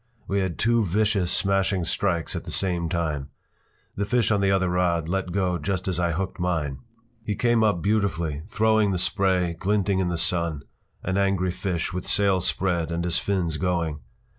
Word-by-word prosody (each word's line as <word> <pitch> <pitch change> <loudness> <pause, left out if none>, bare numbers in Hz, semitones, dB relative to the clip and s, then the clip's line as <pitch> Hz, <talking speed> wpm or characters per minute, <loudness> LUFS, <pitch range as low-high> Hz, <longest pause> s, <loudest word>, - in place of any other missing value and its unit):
We 100 - 0
had 95 -4 -2
two 115 0 +2
vicious, 100 -1 +1
smashing 95 -1 +1
strikes 85 0 -1
at - - -4
the - - -9
same 90 -3 0
time. 75 -5 -2 0.7
The 100 - -1
fish 115 +2 +1
on 100 -2 +2
the 100 - +2
other 95 -1 +2
rod 90 -2 +1
let 95 0 -2
go 90 -2 0
just 90 +4 -2
as 90 -2 -1
I 85 -1 +1
hooked 95 +3 -3
mine. 80 -6 -1 0.4
He 105 -2 -2
came 120 0 +2
up 100 -6 +1
beautifully, 85 -8 0
throwing 110 -2 +3
the 95 - 0
spray, 95 -2 +1
glinting 100 -1 +1
in 95 - +1
the 85 - -1
sun, 85 -3 0 0.4
an 95 +1 -1
angry 95 -2 +1
fish 90 -1 -3
with 90 0 -4
sail 100 -2 +3
spread 85 -2 0
and 85 +1 -2
his 85 -1 +1
fins 90 -6 -1
going. 85 -4 -1
90 Hz, 185 wpm, -25 LUFS, 85-100 Hz, 0.7 s, throwing